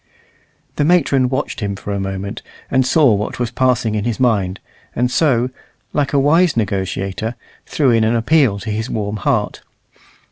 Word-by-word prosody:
The - - +2
matron 140 -6 +3
watched 135 +2 -3
him 100 -3 -3
for 100 +1 -5
a 100 - -2
moment, 95 0 -4 0.3
and 130 -1 +2
saw 145 -7 +4
what 105 +1 -2
was 120 -2 -2
passing 125 -3 +1
in 105 -1 -1
his 120 0 -2
mind, 100 -7 +1 0.4
and 125 +1 0
so, 130 -4 +2 0.4
like 145 -1 0
a 145 - +1
wise 155 +2 +3
negotiator, 100 +1 -2 0.3
threw 140 -5 +2
in 115 -1 +3
an 110 +2 +2
appeal 120 -2 +3
to 110 - -4
his 110 +3 -3
warm 105 -1 -3
heart. 95 - -1
115 Hz, 170 wpm, -18 LUFS, 105-135 Hz, 0.4 s, saw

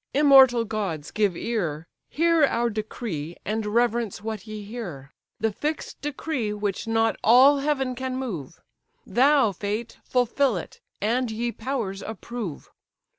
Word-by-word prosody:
immortal 265 -5 +7
gods! 195 -9 -3
give 205 -5 +1
ear, 170 -10 -2 0.2
Hear 330 0 +3
our 235 -3 0
decree, 210 -7 -5
and 215 +1 -2
reverence 235 -1 +1
what 220 -1 -5
ye 215 -1 -6
hear; 190 - -7 0.3
The 220 0 +1
fix'd 300 +8 -4
decree 285 -6 -2
which 205 0 -3
not 225 0 +2
all 265 +5 +7
heaven 275 -3 0
can 260 0 -4
move; 175 - -5 0.5
Thou, 265 -2 +4
fate! 210 +5 -4
fulfil 250 -1 +1
it! 175 - -8 0.2
and, 240 +4 +1
ye 235 +2 -2
powers, 225 -6 -3
approve! 220 -5 -6
225 Hz, 130 wpm, -25 LUFS, 205-255 Hz, 0.5 s, immortal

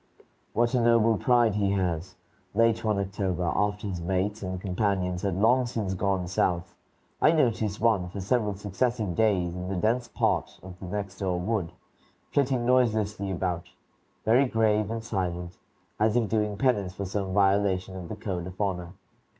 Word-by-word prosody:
What 120 +2 +2
a 125 - +3
noble 115 -1 +4
pride 120 -1 +3
he 100 -1 +1
has! 90 -3 -2 0.4
Late 115 0 +3
one 110 -2 +1
October, 95 -2 -2
after 105 0 0
his 95 -4 -3
mates 95 +4 -1
and 95 -1 -4
companions 90 -1 -1
had 95 -2 -1
long 120 +6 +3
since 110 -5 -2
gone 95 -1 0
South, 90 -1 0 0.5
I 155 - +6
noticed 115 -9 +1
one 105 -6 +2
for 100 - -6
several 105 +1 0
successive 105 +1 -1
days 95 -5 +2
in 90 +1 -5
the 95 - -2
dense 115 +6 +1
part - - -1
of 90 -1 -10
this 90 - -7
next 100 0 -4
door 90 -3 -1
wood, 95 -3 -1 0.6
flitting 130 -4 +1
noiselessly 110 -5 +2
about, 90 -1 -2 0.6
very 120 +5 +5
grave 110 -3 +2
and 115 0 -4
silent, 90 -4 -3 0.4
as 110 +1 +3
if 120 -3 +2
doing 105 -1 0
penance 100 -7 +1
for 100 - -4
some 95 0 -3
violation 95 -2 +2
of 90 -2 -7
the - - -4
code 90 -4 -4
of 90 0 -10
honor. 90 -4 -2
100 Hz, 165 wpm, -27 LUFS, 95-110 Hz, 0.6 s, I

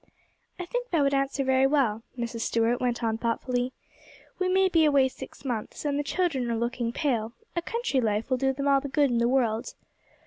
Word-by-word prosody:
'I 360 - -3
think - - -3
that 325 -5 +2
would 280 0 +2
answer 275 0 0
very 265 0 +3
well,' 260 -7 +1 0.2
Mrs. 235 -1 -4
Stuart 230 +2 +1
went 245 -1 -1
on 225 -1 0
thoughtfully; 245 +2 -1 0.7
'we 370 -1 +1
may 380 +1 +4
be 330 -3 +3
away 280 -3 +4
six 260 - -11
months: 240 +2 -4
and 285 -1 0
the - - 0
children 285 -6 0
are 230 - 0
looking 235 0 -1
pale, 235 -5 -1 0.2
a 340 - 0
country 455 - -1
life 220 +2 -1
will 255 - +3
do 265 +1 +1
them 275 +1 -3
all 275 -1 +4
the 285 - -4
good 280 -1 +2
in 235 - +1
the 235 0 +2
world. 235 -4 0
265 Hz, 210 wpm, -27 LUFS, 235-290 Hz, 0.7 s, may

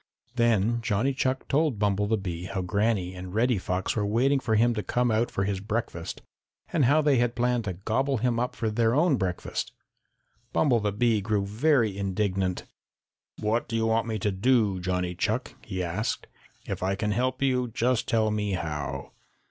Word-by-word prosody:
Then 115 -1 +2
Johnny 115 +5 +1
Chuck 130 0 -1
told 150 -4 +1
Bumble 105 0 +1
the 110 +1 +2
Bee 90 -3 -5
how 95 0 -3
Granny 100 -1 0
and 90 +1 -8
Reddy 120 -1 +2
Fox 90 +1 -2
were 105 - 0
waiting 125 +7 +2
for 110 -4 0
him 120 +2 +4
to 105 - -2
come 120 +2 0
out 110 +2 +1
for 100 - -1
his 100 -1 -1
breakfast 105 -5 -4 0.5
and 155 -6 +3
how 150 +5 +4
they 145 -3 +4
had 120 0 +1
planned 120 -1 +1
to 95 - -2
gobble 125 +9 0
him 120 0 0
up 125 +1 -2
for 110 -2 -1
their 115 +2 +2
own 155 0 +4
breakfast. 90 -4 -3 0.8
Bumble 130 -6 +3
the 105 -1 0
Bee 110 0 +2
grew 105 -1 0
very 115 0 +2
indignant. 95 -2 -1 0.8
"What 110 +3 0
do 115 - -4
you 115 0 +1
want 115 0 +1
me 110 -1 -1
to 105 0 0
do, 105 -1 +2
Johnny 90 0 -1
Chuck?" 110 +7 -1
he 95 -3 -3
asked. 90 +6 -2 0.4
"If - - -4
I 95 +1 0
can 105 +1 -1
help 130 +5 0
you, 125 -2 +2
just 120 +1 0
tell 110 -1 +2
me 105 -2 -1
how." 75 -5 -4
110 Hz, 190 wpm, -27 LUFS, 100-120 Hz, 0.8 s, him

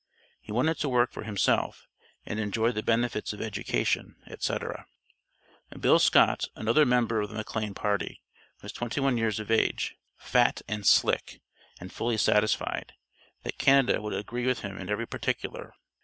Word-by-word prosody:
He - - -10
wanted 140 +8 +1
to 145 - 0
work 125 -1 +2
for - - -7
himself 105 -3 0 0.4
and 105 - -4
enjoy 110 +2 +1
the 110 -3 -3
benefits 115 -2 0
of 105 - -10
education, 100 - -1
etc. - - -4 0.9
Bill - - +5
Scott, - - +4
another 115 +7 +3
member 115 -3 +2
of 105 - -3
the 110 - -9
McLane 105 -2 -4
party, 105 -1 -2 0.4
was - - -6
twenty 120 +3 -3
one 135 -2 +2
years 110 -2 0
of 110 +1 -5
age, 110 - +1 0.2
"fat - - +2
and 105 -1 -2
slick," - - +3 0.4
and 90 +1 -10
fully 115 -1 -1
satisfied, 105 0 +1 0.5
that - - -5
Canada 135 -4 +4
would 105 - -4
agree 120 +4 -3
with 130 -2 +1
him 100 -1 -6
in 95 0 -7
every 105 +3 -1
particular. - - -4
110 Hz, 155 wpm, -28 LUFS, 105-120 Hz, 0.9 s, Bill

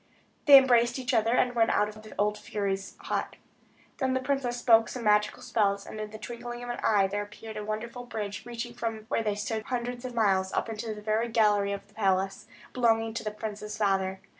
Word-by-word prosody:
They 280 -1 +12
embraced 245 -2 +4
each 260 +1 -2
other, 230 +1 +3
and 250 0 +2
went 230 -1 +3
out 210 - +2
of 215 0 -10
the 215 - -12
old 210 +1 +1
fury's 195 -2 -3
hut. - - -3 0.6
Then 260 -2 0
the - - +2
princess 260 -2 -1
spoke 230 -2 +5
some 250 - -6
magical 210 0 +2
spells; 200 -2 +1
and 215 - -8
in 215 - -5
the 215 - -9
twinkling 240 +1 -7
of 245 - -4
an 240 - -5
eye 205 -3 +4
there 205 +2 -2
appeared 215 +1 -9
a 210 - -4
wonderful 230 +4 -5
bridge, 210 -4 -5
reaching 240 0 -6
from 225 -2 -4
where 255 - +1
they 210 -2 -1
stood 215 +2 -2
hundreds 245 0 -3
of 250 -1 -6
miles, 190 -4 +2
up 225 - -1
to 215 0 -4
the 210 - -10
very 220 +2 0
gallery 210 -3 +3
of 200 0 -5
the 205 - -25
palace, 195 -2 0 0.3
belonging 225 -2 +2
to 230 - -4
the 215 - -1
prince's 210 0 -6
father. 190 -2 +1
220 Hz, 215 wpm, -28 LUFS, 210-240 Hz, 0.6 s, They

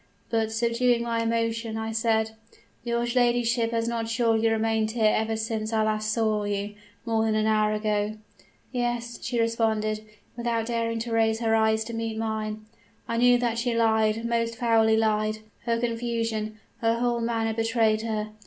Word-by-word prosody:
But, 225 -1 +1
subduing 235 +1 +1
my 230 -1 -1
emotion, 230 0 -1
I 220 0 -3
said: 220 0 +1 0.5
"'Your 235 0 0
ladyship 240 -1 +2
has 230 0 -1
not 230 -1 -2
surely 225 -1 +2
remained 220 0 +1
here 220 -1 +2
ever 220 0 0
since 220 0 -3
I 220 -1 +2
last 215 0 0
saw 215 -2 +1
you, 205 0 -2 0.3
more 225 -1 +1
than 220 -1 +1
an 215 0 +1
hour 215 -1 +3
ago?' 210 0 -1 0.6
"'Yes,' 240 -1 -2
she 240 -1 -2
responded, 220 -2 0 0.3
without 235 -1 -1
daring 230 -1 -1
to 235 0 -4
raise 225 0 +2
her 225 -1 +2
eyes 220 0 +2
to 230 +1 -7
meet 225 -1 -3
mine. 215 -1 -3 0.4
I 230 - -1
knew 245 +1 +5
that 235 -1 -1
she 240 0 0
lied, 220 0 +2
most 230 0 0
foully 225 -1 +3
lied: 215 -1 +1 0.3
her 230 -1 +1
confusion, 230 -2 -2 0.2
her 230 -1 +2
whole 240 0 0
manner 225 -1 0
betrayed 225 -1 +1
her. 215 -1 -3
225 Hz, 165 wpm, -26 LUFS, 220-235 Hz, 0.6 s, knew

